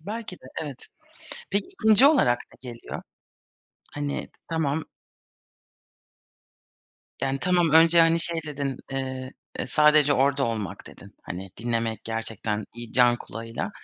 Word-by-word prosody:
Belki 210 +2 -6
de, - - -20 0.2
evet. 140 -5 -8 0.6
Peki, 200 +1 0 0.2
2'nci 220 +5 +7
olarak 190 - +4 0.3
ne 125 - -5
geliyor? 115 - -8 0.9
Hani, 145 -1 -3
t - - -28
tamam 160 -1 0 2.4
Yani, 135 0 0
tamam. 175 -2 +2
Önce, 165 +2 +7
hani, 165 0 +4
şey 165 0 0
dedin, 140 -3 -3 0.2
eee, 130 -1 -4 0.3
eee, - - -2
"Sadece 150 -1 +5
orada 140 +1 +2
olmak." 105 -5 -4
dedin. - - -14
Hani, 95 +1 -7
dinlemek 115 -1 -2
gerçekten 110 -2 -3
iyi 120 -1 -9
can 120 -1 +5
kulağıyla. 115 0 -6
135 Hz, 125 wpm, -26 LUFS, 115-165 Hz, 2.4 s, 2'nci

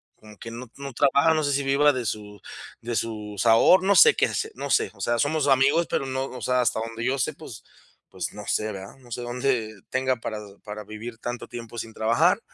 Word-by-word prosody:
como 105 -1 -16
que 115 - -8
no 120 +2 -8
no 140 0 -6
trabaja, 140 +5 +4
no 155 -1 +1
sé 145 - +1
si 140 +1 0
viva 140 +2 +4
de 125 -2 -3
su 105 0 -5 0.4
de 120 0 -4
sus 105 -3 -3
aho 115 +11 +6
no 200 +2 +2
sé 460 0 +8
qué - - +3
hace, 440 - -3
no 140 - -5
sé. 100 - +2
O 100 - -14
sea, 120 +4 0
somos 145 +1 +1
amigos, 140 +5 +4
pero - - -1
no, 130 0 -2
o 130 -2 -8
sea, 125 0 +2
hasta 115 -2 +1
donde 115 +1 -5
yo 135 - +1
sé, 155 +4 0
pues 140 -6 -11 0.5
pues, - - -4
no - - -9
sé, 110 0 0
¿verdad? 95 -1 -9
No 125 -2 -18
sé 120 - -4
dónde 120 -3 -1
tenga 130 0 +1
para 110 -2 -5 0.2
para 105 0 -7
vivir 110 +3 -8
tanto 120 +1 -5
tiempo 120 -1 -8
sin 115 -1 -6
trabajar, 110 +2 +3
120 Hz, 230 wpm, -25 LUFS, 110-140 Hz, 0.5 s, sé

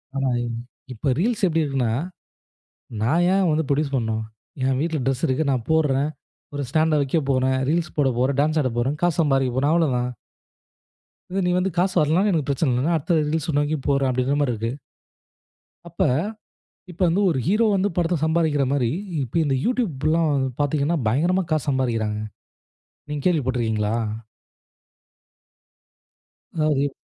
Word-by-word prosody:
ஆனா, 135 -1 0
இவங்க 120 -1 -3 0.4
இப்ப 125 +5 -2
Reels 220 +6 0
எப்டி 165 -2 +1
இருக்குன்னா. 135 -6 0 1.1
நான் 160 +11 +2
ஏன் 195 0 +3
வந்து 155 +1 +1
புரொடியூஸ் 140 0 0
பண்ணனும்? 110 -3 -1 0.4
என் 130 -1 +1
வீட்ல 160 0 -1
ட்ரெஸ் 135 -2 -1
இருக்கு. 135 +4 +1
நான் 125 -4 0
போடுறேன். 150 -3 +2 0.4
ஒரு 145 0 -3
ஸ்டாண்ட 155 +2 +2
வைக்கப் 140 +1 0
போறேன். 130 0 +2
ரீல்ஸ் 165 0 0
போடப் 135 -5 +1
போறேன். 130 +2 +1
டான்ஸ் 155 +2 +2
ஆடப் 125 -4 -2
போறேன். 130 +5 0
காசு 175 -2 +1
சம்பாரிக்க 135 -4 +2
போறேன். 140 +3 +2
அவ்ளோதான். 125 -7 +1 1.2
இது 195 - -1
நீ 180 - +2
வந்து 185 +1 0
காசு 185 +2 +1
வரலனா 155 +4 +3
எனக்கு 160 -7 0
பிரச்சன 140 0 +1
இல்ல. 125 +1 0
நான் 170 - +2
அடுத்த 160 +3 0 0.2
Reels 160 -1 -1
அ - - -6
நோக்கி 145 +1 0
போறேன், 140 -1 +2
அப்டீங்கிற 130 +2 0
மாரி 130 -4 +1
இருக்கு. 115 +1 -3 1.2
அப்ப 170 - -2 0.9
இப்போ 180 +2 -2
வந்து 175 +4 +2
ஒரு 150 -6 0
ஹீரோ 215 +5 +3
வந்து 195 +1 +1
படத்துல 175 -1 +1
சம்பாரிக்கிற 160 -3 +1
மாரி, 130 -5 +1 0.3
இப்ப 130 +7 -2
இந்த 135 -2 +1
YouTubeலாம் 165 - +1 0.3
பாத்தீங்கன்னா 145 +3 +1
பயங்கரமா 175 +11 +2
காசு 155 -1 0
சம்பாரிக்கிறாங்க. 115 -6 0 0.9
நீங்க 150 -1 -3
கேள்வி 175 -4 +3
பட்டுருக்கீங்களா? 110 -4 0 2.6
அதாவது 150 -3 +1
145 Hz, 150 wpm, -23 LUFS, 130-165 Hz, 2.6 s, ஏன்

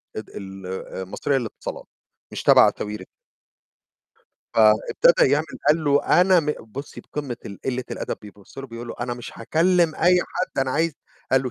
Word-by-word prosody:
ال 110 - -8 0.3
المصرية 95 +8 -3
للاتصالات، 115 -4 -6 0.5
مش - - -5
تبع - - +7
ساويرس. 105 -2 -5 1.5
فابتدh 110 +9 +4
يعمل 145 +2 +2 0.2
قال 155 +1 +3
له 145 0 +3 0.2
أنا 185 -1 +5
م 150 - -7 0.2
بُصي 130 +6 -9
بقمة 140 -5 -5
ال 100 - -8
قلة 130 -1 -2
الأدب، - - -4
بيبُص 105 +3 -14
له 135 - -6
بيقول 120 -1 -8
له: - - -5
"أنا 120 0 -2
مش 120 -1 -9
هاكلم 165 +6 +2
أي 180 +1 +4
حد، 185 - -4
أنا 135 -1 +1
عايز" 160 +3 +1 0.4
قال 130 0 +4
له: 125 - -3
130 Hz, 155 wpm, -23 LUFS, 110-155 Hz, 1.5 s, تبع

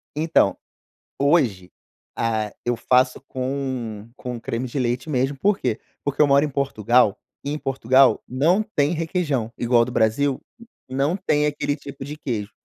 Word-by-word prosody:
Então, 155 -10 +2 0.6
hoje, 130 - +2 0.4
ah, 110 -2 -1
eu 120 0 +1
faço 125 +2 +2
com 130 -5 -4
com 125 -2 -6
creme 115 +2 -3
de 130 +3 -4
leite 125 +4 -1
mesmo. 135 0 0
Por 205 +7 +2
quê? 120 -4 -1 0.2
Porque 145 +1 0
eu 150 - +6
moro 140 +1 +4
em - - -3
Portugal 125 -5 +2 0.3
e, 140 - -3
em 150 - -2
Portugal, 135 -1 +3
não 165 - +2
tem 150 -7 0
requeijão 160 - -1
igual 120 -1 +3
do 125 - -6
Brasil. 130 +5 +1 0.5
Não 135 +6 0
tem 150 -6 +1
aquele 145 -1 -1
tipo 140 -2 -9
de 145 +2 -7
queijo. 110 -8 -4
130 Hz, 155 wpm, -23 LUFS, 120-145 Hz, 0.6 s, eu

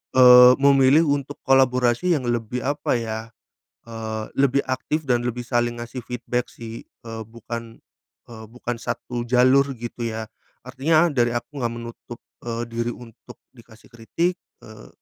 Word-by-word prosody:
eee, 125 -1 +9
memilih 140 +2 +5
untuk 145 -1 -2
kolaborasi 130 +4 +3
yang 135 - -5
lebih 120 0 -2
apa 145 -1 0
ya, 110 -1 -4 0.7
eee, 110 -1 -5 0.2
lebih 140 0 +3
aktif 130 +4 -2
dan 120 -3 0
lebih 125 0 -3
saling 120 -1 -1
ngasih 120 +2 -7
feedback 125 0 -3
sih, 115 0 -10
eee, 115 -1 -9
bukan, 115 0 -8 0.5
eee, 110 -1 -10
bukan 120 +1 -5
satu 120 0 -4
jalur 130 +3 +4
gitu 120 0 -5
ya. 110 0 -4 0.4
Artinya 155 +6 +2
dari 120 -3 +1
aku 140 +4 -5
nggak 120 -1 -1
menutup, 115 0 -9 0.3
eee, 115 0 -3
diri 115 +1 -2
untuk 115 -3 -14 0.2
dikasih 115 -2 -19
kritik, 165 +10 -2 0.3
eee, 110 0 -13
120 Hz, 145 wpm, -23 LUFS, 115-130 Hz, 0.7 s, eee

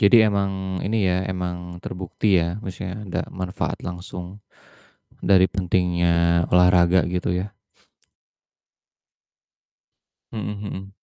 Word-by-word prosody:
Jadi 100 +1 +7
emang 95 -2 -2
ini 105 -3 +1
ya, 90 0 +2
emang 90 -1 -3 0.3
terbukti 95 +3 -3
ya, 85 +5 -2
maksudnya 95 -1 -6
ada - - -1
manfaat 90 -1 -3
langsung 90 +1 -7 0.9
dari 95 -1 +7
pentingnya 85 -2 +2
olahraga 90 0 +5
gitu 90 0 -1
ya. 100 - -4 2.8
Hmm 105 -2 -3
hmm. 95 -2 -6
90 Hz, 100 wpm, -23 LUFS, 90-95 Hz, 2.8 s, Jadi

